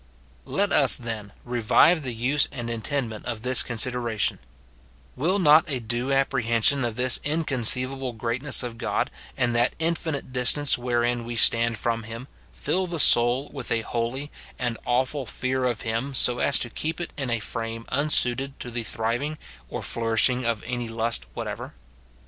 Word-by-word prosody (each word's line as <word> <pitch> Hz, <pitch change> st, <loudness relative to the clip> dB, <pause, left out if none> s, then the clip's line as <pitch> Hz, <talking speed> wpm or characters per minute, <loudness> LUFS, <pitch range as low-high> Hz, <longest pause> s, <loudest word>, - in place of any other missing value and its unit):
Let 200 Hz, 0 st, 0 dB
us, 140 Hz, -3 st, +7 dB
then, 110 Hz, -4 st, -6 dB
revive 125 Hz, +8 st, +3 dB
the 130 Hz, -3 st, -5 dB
use 130 Hz, +6 st, +1 dB
and 120 Hz, -4 st, -5 dB
intendment 115 Hz, -1 st, -4 dB
of 115 Hz, -2 st, -5 dB
this 130 Hz, 0 st, +6 dB
consideration: 120 Hz, -2 st, -1 dB, 0.8 s
Will 170 Hz, +9 st, 0 dB
not 160 Hz, -1 st, +5 dB
a 135 Hz, -3 st, -2 dB
due 120 Hz, +3 st, -3 dB
apprehension 135 Hz, -1 st, +2 dB
of 115 Hz, -2 st, -2 dB
this 125 Hz, +1 st, +4 dB
in 155 Hz, +3 st, -1 dB
conceivable 130 Hz, 0 st, +1 dB
greatness 120 Hz, +5 st, 0 dB
of 115 Hz, -2 st, -7 dB
God, -, -, -1 dB, 0.3 s
and 120 Hz, -1 st, 0 dB
that 120 Hz, +1 st, +1 dB
infinite 160 Hz, -4 st, -3 dB
distance 135 Hz, +3 st, +3 dB
wherein 120 Hz, -1 st, -1 dB
we 120 Hz, +1 st, -6 dB
stand 115 Hz, 0 st, +3 dB
from 115 Hz, +2 st, -2 dB
him, 115 Hz, +3 st, -8 dB, 0.2 s
fill 185 Hz, 0 st, -2 dB
the 170 Hz, -1 st, -5 dB
soul 125 Hz, 0 st, +5 dB
with 135 Hz, -4 st, -6 dB
a 115 Hz, -1 st, +1 dB
holy 120 Hz, +6 st, -4 dB, 0.3 s
and 120 Hz, -2 st, -2 dB
awful 130 Hz, +2 st, -1 dB
fear 130 Hz, +2 st, -2 dB
of 120 Hz, -3 st, -1 dB
him, 115 Hz, +5 st, -3 dB
so 125 Hz, 0 st, +3 dB
as 140 Hz, -, +3 dB
to 120 Hz, -, -2 dB
keep 160 Hz, +7 st, -4 dB
it 175 Hz, -, -6 dB
in 135 Hz, -3 st, -4 dB
a 115 Hz, -, +1 dB
frame 115 Hz, +1 st, -6 dB
unsuited 135 Hz, -2 st, +1 dB
to 125 Hz, -, -7 dB
the 120 Hz, 0 st, -3 dB
thriving 115 Hz, +7 st, -3 dB, 0.3 s
or -, -, -5 dB
flourishing 115 Hz, +2 st, 0 dB
of 115 Hz, -2 st, -2 dB
any 120 Hz, -1 st, -4 dB
lust 115 Hz, -, 0 dB
whatever -, -, -6 dB
125 Hz, 165 wpm, -24 LUFS, 115-135 Hz, 0.8 s, us